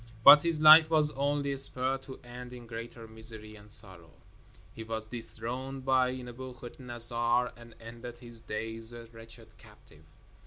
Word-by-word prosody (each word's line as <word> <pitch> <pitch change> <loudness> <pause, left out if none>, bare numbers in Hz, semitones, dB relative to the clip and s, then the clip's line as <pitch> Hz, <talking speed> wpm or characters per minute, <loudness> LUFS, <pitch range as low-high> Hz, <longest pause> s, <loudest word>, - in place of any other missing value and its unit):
But 145 - +9
his 165 -1 0
life 155 +1 +8
was 155 -2 +2
only 140 0 -2
spared 135 0 +4
to 130 - -10
end 125 0 -11
in 120 -1 -12
greater 115 0 -10
misery 110 -1 -10
and 105 0 -17
sorrow. 95 -6 +2 0.6
He 110 - -9
was 110 0 -6
dethroned 125 +3 -7
by 130 -1 +1
Nebuchadnezzar 120 -1 -2
and 120 -1 -16
ended 120 +1 -11
his 120 -2 -14
days 115 +1 -3
a 120 -1 -10
wretched 115 -1 -14
captive. 80 -3 -20
120 Hz, 145 wpm, -29 LUFS, 115-130 Hz, 0.6 s, But